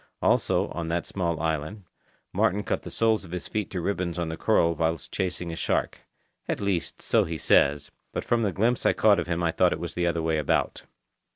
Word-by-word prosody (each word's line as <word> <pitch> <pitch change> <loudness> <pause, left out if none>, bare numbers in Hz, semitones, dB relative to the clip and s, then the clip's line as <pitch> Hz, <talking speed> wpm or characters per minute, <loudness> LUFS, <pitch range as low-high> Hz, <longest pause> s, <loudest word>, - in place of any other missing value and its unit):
Also, - - +2
on 85 -2 -4
that 85 +1 -1
small 85 -4 -2
island, 80 +5 -2 0.5
Martin 105 +3 +1
cut - - -2
the - - -8
soles 110 -2 +1
of 90 - -12
his 90 +1 -5
feet 105 -2 -3
to 95 - -3
ribbons 90 -1 -2
on 85 -2 -2
the 80 - -3
coral 85 -4 +2
whilst 80 -1 -2
chasing 90 -2 -2
a - - -5
shark—at - - -4
least, 100 -5 -2
so - - +3
he 80 0 -4
says, 70 -1 +3 0.2
but - - -4
from 120 -1 +2
the 105 -3 +1
glimpse 115 +7 +1
I - - +4
caught 105 -2 +4
of - - -3
him 85 0 -1
I 85 - +2
thought 90 +1 +3
it - - -5
was 85 -1 -5
the 90 0 0
other 85 -1 0
way 80 -1 +1
about. 75 - 0
85 Hz, 215 wpm, -26 LUFS, 80-100 Hz, 0.5 s, I